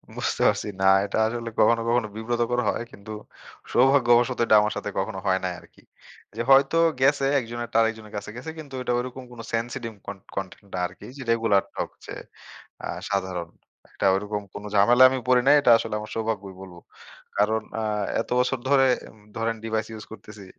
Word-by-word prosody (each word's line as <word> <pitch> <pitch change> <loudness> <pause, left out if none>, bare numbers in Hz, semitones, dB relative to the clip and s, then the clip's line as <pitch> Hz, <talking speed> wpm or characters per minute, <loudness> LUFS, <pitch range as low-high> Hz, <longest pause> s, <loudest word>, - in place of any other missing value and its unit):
বুঝতে - - -2
পারছি। - - 0
না, - - +2 0.2
এটা 100 - -3
আসলে 115 0 -4
কখনো, 115 +1 +4
কখনো 120 -2 +1
বিব্রতকর 120 +2 -1
হয়। - - -2
কিন্তু 100 +2 -11 0.6
সৌভাগ্যবশত 125 -1 +4
এটা 110 - +5
আমার 105 0 0
সাথে 105 - -4
কখনো 95 0 -3
হয় 95 -1 +2
নাই 90 -1 -1
আরকি। - - -21 0.5
যে 115 - -2
হয়তো 135 +4 +5 0.2
গেছে 135 +1 +3
একজনের 120 -1 -5
একটা - - -1
আরেকজনের 110 -2 -2
কাছে 100 +1 -6
গেছে, 125 +6 -7
কিন্তু 145 -3 -10
এটা 125 - -1
ঐরকম 130 +1 -6
কোনো 115 -1 -9
সেনসিটিভ 115 +1 -3 0.2
কন - - -6 0.2
কনটেন্ট 95 +1 -6
না 90 - -2
আরকি 90 - -14
যে, - - -8
রেগুলার 115 -4 +3
ঠকছে - - -6 0.7
আ - - -4 0.2
সাধারণ। 95 -4 -2 0.5
এটা - - -1
ওরকম 105 +1 -2
কোন 100 - -7
ঝামেলা 120 +5 +5
আমি 130 - -1
পড়ি 125 -1 +5
নাই। 145 - +7
এটা 140 - +3
আসলে 105 - -4
আমার 105 0 -8
সৌভাগ্যই 110 -4 -3
বলব। 95 -2 -11 0.6
কারণ 110 +2 +2 0.2
আ - - -2 0.4
এত - - -5
বছর 125 +1 +1
ধরে 135 -1 +5 0.2
উম 110 - -20 0.2
ধরেন 115 0 -1
ডিভাইস 110 -1 -1
ইউস 110 -1 -8
করতেছি। 105 -1 -11
115 Hz, 180 wpm, -25 LUFS, 105-125 Hz, 0.7 s, নাই